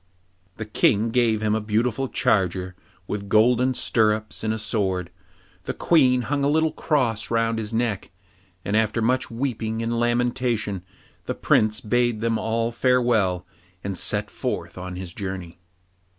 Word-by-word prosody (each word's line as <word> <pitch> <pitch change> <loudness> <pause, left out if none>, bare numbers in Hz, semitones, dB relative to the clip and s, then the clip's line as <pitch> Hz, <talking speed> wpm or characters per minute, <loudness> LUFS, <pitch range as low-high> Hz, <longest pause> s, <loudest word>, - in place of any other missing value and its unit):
The 110 - -4
King 105 +1 +2
gave 115 -3 +2
him 105 0 +2
a 110 - 0
beautiful 115 +5 0
charger, 95 -2 0 0.3
with 100 +1 -5
golden 125 +4 +4
stirrups, 110 -2 0
and 110 - 0
a 110 - -1
sword. 95 -5 -1 0.5
The - - -3
Queen 130 -7 +3
hung 140 +3 -1
a 140 - +3
little 160 +1 +2
cross 115 -8 0
round 115 0 +1
his 110 -1 -5
neck, 115 -3 -1 0.6
and 100 - 0
after 110 +1 +2
much 125 +3 +1
weeping 115 -2 -2
and 115 0 -1
lamentation 120 -4 0 0.5
the - - -2
Prince 110 0 +2
bade 120 0 +1
them 115 0 0
all 115 +1 0
farewell 115 -7 +2 0.4
and 100 -1 -3
set - - -2
forth - - -4
on 90 0 -6
his 90 -1 -7
journey. 95 -4 -6
110 Hz, 150 wpm, -24 LUFS, 105-120 Hz, 0.6 s, golden